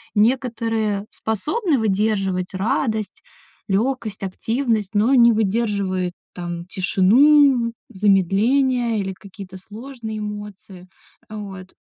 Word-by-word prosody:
некоторые 225 -3 0
способны 300 - -1
выдерживать 195 -3 0
радость, 220 +2 -2 0.5
лёгкость, 220 0 -1
активность, 225 +2 -1
но 220 +6 +3
не 235 -1 +7
выдерживают, 200 -4 -1 0.2
там, 175 -1 -6
тишину, 235 +7 +4 0.2
замедление 220 +5 +2
или 190 -1 -3
какие-то 190 -1 -11
сложные 220 +2 -8
эмоции. 205 -3 -8 0.4
Э, 215 - -8
вот. 190 -3 -9
210 Hz, 90 wpm, -21 LUFS, 195-235 Hz, 0.5 s, не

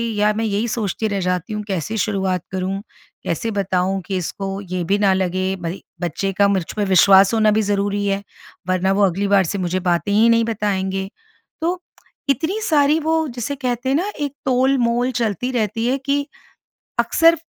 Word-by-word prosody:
या 210 +1 +3
मैं 225 +1 -1
यही 210 +2 0
सोचती 220 -1 -2
रह 200 -1 -1
जाती 180 +2 -2
हूँ 210 0 -3
कैसे 195 +3 -2
शुरुआत 190 -4 0
करूँ, 190 +1 -2 0.4
कैसे 225 +7 -2
बताऊँ 195 -1 0
कि 190 -2 -2
इसको 195 +3 -4
ये 185 -2 -3
भी 195 +4 +1
ना 195 -2 +4
लगे? 185 0 0
भई 175 +1 -5 0.2
बच्चे 180 +3 -2
का 200 0 +5
मुझ 195 -3 +1
पे 210 -1 0
विश्वास 195 +2 +6
होना 215 -1 +4
भी 220 +1 +2
ज़रूरी 205 0 0
है, 195 0 0 0.5
वरना 185 +1 +2
वो 205 - +2
अगली 195 +2 0
बार 200 -1 +4
से 200 - -2
मुझे 185 0 -1
बातें 175 +2 0
ही 220 +3 +5
नहीं 230 0 +4
बताएँगे। 195 -3 -1 0.5
तो 350 +2 0 0.5
इतनी 335 +9 0
सारी 300 0 +4
वो 320 0 +1
जिसे 245 +2 -4
कहते 250 -1 -2
हैं 270 - +2
न 400 +5 -1
एक 285 - -3
तोलमोल 255 -1 +2
चलती 230 +3 -1
रहती 225 -1 -1
है 265 +2 +1
कि, 280 +1 -1 0.7
अक्सर 330 0 +4
205 Hz, 180 wpm, -20 LUFS, 190-240 Hz, 0.7 s, विश्वास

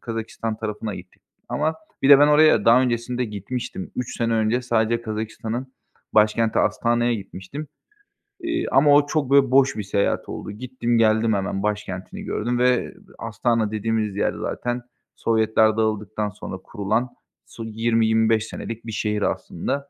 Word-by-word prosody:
Kazakistan 115 -1 -4
tarafına 105 -1 -4
gittik 90 0 -13 0.3
ama 155 +2 0 0.3
bir 135 - +3
de 140 - +10
ben 145 +1 +6
oraya 155 +1 +5
daha 120 +3 +6
öncesinde 125 0 -1
gitmiştim. 105 -1 -5
3 125 - -4
sene 115 -1 +1
önce 110 +3 +1
sadece 115 -1 +1
Kazakistan’ın 110 +2 -4 0.5
başkenti 110 +1 +3
Astana’ya 120 0 +1
gitmiştim, 100 +8 -7 0.7
eee, 335 0 -2
ama 145 +2 +5
o 145 0 +4
çok 150 -4 -1
böyle 135 -2 +5
boş 135 -2 +4
bir 105 - -2
seyahat 100 +1 -1
oldu. - - -6
Gittim, 120 +1 -2
geldim 110 0 +3
hemen 95 0 -2
başkentini 105 -3 -4
gördüm 120 +3 -2
ve 125 +7 +2 0.2
Astana 115 0 0
dediğimiz 110 -1 -1
yer - - 0
zaten 120 0 -3 0.3
Sovyetler 110 -1 +2
dağıldıktan 105 -1 -1
sonra 95 -1 -7
kurulan, 110 +4 -1 0.4
su, 115 - -9
20-25 110 0 +2
senelik 115 0 -7
bir 115 - -5
şehir 105 -1 -1
aslında. 140 +6 -2
115 Hz, 145 wpm, -23 LUFS, 105-125 Hz, 0.7 s, de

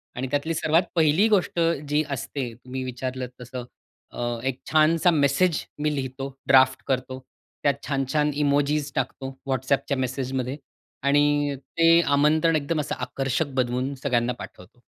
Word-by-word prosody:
आणि 130 +2 -3
त्यातली 145 +3 0
सर्वात 160 +2 +2
पहिली 165 +6 +4
गोष्ट 190 -4 +1 0.3
जी 150 +1 +2
असते 125 -2 -4
तुम्ही 130 +2 -7
विचारलत 130 0 -4
तसं, 125 0 -7 0.5
अ - - -5 0.2
एक 130 -1 -2
छानसा 160 +3 +4
मेसेज 155 +2 +2 0.2
मी 150 0 0
लिहितो, 135 0 -4 0.2
ड्राफ्ट 130 0 +5
करतो. 130 0 -2 0.4
त्यात 140 - +4
छान-छान 145 +2 0
इमोजीज 145 +1 +1
टाकतो, 135 0 -3
WhatsAppच्या 135 +2 0
मेसेजमध्ये 130 0 -2 0.5
आणि 145 0 +3 0.2
ते 165 0 +5 0.3
आमंत्रण 155 +3 +3
एकदम 155 +1 -1
असं 145 - -3
आकर्षक 135 +2 -2
बनवून 130 +2 0
सगळ्यांना 125 -2 +1
पाठवतो. 120 +7 -12
140 Hz, 130 wpm, -25 LUFS, 130-150 Hz, 0.5 s, ड्राफ्ट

